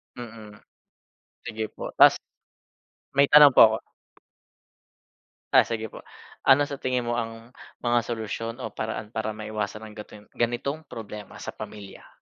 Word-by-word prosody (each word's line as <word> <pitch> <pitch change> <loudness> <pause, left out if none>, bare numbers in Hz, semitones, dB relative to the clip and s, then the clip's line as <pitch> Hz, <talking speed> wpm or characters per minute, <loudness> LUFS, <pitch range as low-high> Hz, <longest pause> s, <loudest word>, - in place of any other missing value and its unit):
Mm. 110 -3 -10 0.9
Sige 110 -1 -4
po. - - -7
Tas - - +8 1.0
may 140 0 +5
tanong 145 -1 +9
po - - +7
ako. 110 0 -1 1.8
Ah, - - +8
sige 110 -1 -4
po. - - -12 0.4
Ano 145 +2 +5
sa 140 - -5
tingin 125 -3 -2
mo 120 - 0
ang 115 +1 -6 0.2
mga 120 0 +2
solusyon 115 +1 -5
o - - -4
paraan 110 0 -5
para 110 0 -2
maiwasan 105 -1 -5
ang 105 -1 -11
gatong 105 -1 -11
ganitong 130 +6 -2
problema 105 -4 -9
sa - - -7
pamilya? 105 -2 -10
115 Hz, 140 wpm, -25 LUFS, 110-120 Hz, 1.8 s, tanong